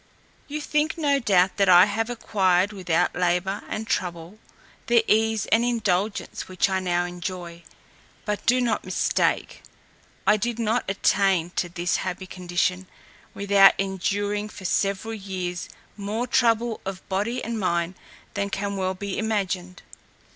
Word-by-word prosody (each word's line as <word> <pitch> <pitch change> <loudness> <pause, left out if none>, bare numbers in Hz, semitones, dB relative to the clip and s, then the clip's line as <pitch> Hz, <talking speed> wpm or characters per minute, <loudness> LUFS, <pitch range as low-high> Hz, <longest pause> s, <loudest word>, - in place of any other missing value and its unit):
You 300 +1 -4
think, 300 +2 0
no 285 -3 +2
doubt, 190 -6 +3
that 195 -2 +3
I 180 0 +9
have 225 +3 -2
acquired, 195 -4 +1
without 180 -3 0
labour 180 +2 0
and 220 - -3
trouble, 175 +1 -3 0.5
the 235 -1 +4
ease 220 0 +2
and 225 +1 +4
indulgence 215 -4 -1
which 185 +1 0
I 190 - +1
now 175 -1 0
enjoy. 175 -1 -6 0.6
But 210 -1 -2
do 250 +2 +5
not 230 -4 0
mistake; 185 - 0 0.6
I 210 - +5
did 235 +2 -2
not 230 +1 0
attain 195 -3 +2
to 175 - -2
this 175 +1 -1
happy 185 0 -4
condition, 185 0 -2 0.5
without 200 -1 +6
enduring 205 +2 -1
for 190 - -11
several 200 +4 0
years 185 -4 -5 0.3
more 215 +4 -3
trouble 235 -2 +2
of 190 -1 -7
body 210 +6 -1
and 230 0 -3
mind 170 -2 0 0.4
than 200 0 -2
can 200 0 -3
well 190 0 -1
be 200 0 -4
imagined. 195 -4 -2
195 Hz, 140 wpm, -24 LUFS, 185-220 Hz, 0.6 s, I